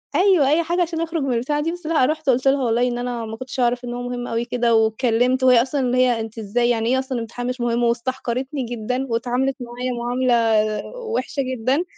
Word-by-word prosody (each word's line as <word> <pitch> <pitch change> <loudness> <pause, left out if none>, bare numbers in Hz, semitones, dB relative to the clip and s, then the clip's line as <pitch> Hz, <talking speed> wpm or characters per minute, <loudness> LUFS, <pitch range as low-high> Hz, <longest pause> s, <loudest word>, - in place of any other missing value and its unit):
أيوه، 360 -7 +4
أي 320 +3 +3
حاجة 345 +2 -1
علشان 330 -1 -1
أخرج 330 -2 -2
من 265 -2 0
البتاعة 270 +6 0
دي 325 +2 -1
بس 350 -1 -9
لأ 310 -5 +3
رُحت 310 0 -1
قُلت 255 +1 +2
لها 270 0 +3
والله 240 +1 +2
إن 240 -1 -2
أنا 245 -1 -3
ما 220 0 -7
كنتش 255 +2 -7
أعرف 245 0 +1
إن 240 - -4
هو 245 - -4
مهم 245 0 -4
أوي 230 +1 -2
كده 240 -1 +1
واتكلمت، 235 +3 +2
وهي 250 -2 +6
أصلًا 270 +3 -1
اللي 250 -1 0
هي 250 -2 +3
أنتِ 225 0 -6
إزاي 235 +3 0
يعني - - +4
يعني 225 -1 0
إيه - - +2
أصلًا 260 -2 -3
امتحان 235 +2 -5
مش 250 0 -3
مُهِم 240 0 0
واستحقرتني 255 +3 -2
جدًا 240 +3 -3
واتعاملت 245 +3 0
معايا 245 +1 -4
معاملة 245 +1 +1 0.6
وِحشة 445 - -3
جدًا، 260 +4 0
250 Hz, 225 wpm, -21 LUFS, 240-270 Hz, 0.6 s, وهي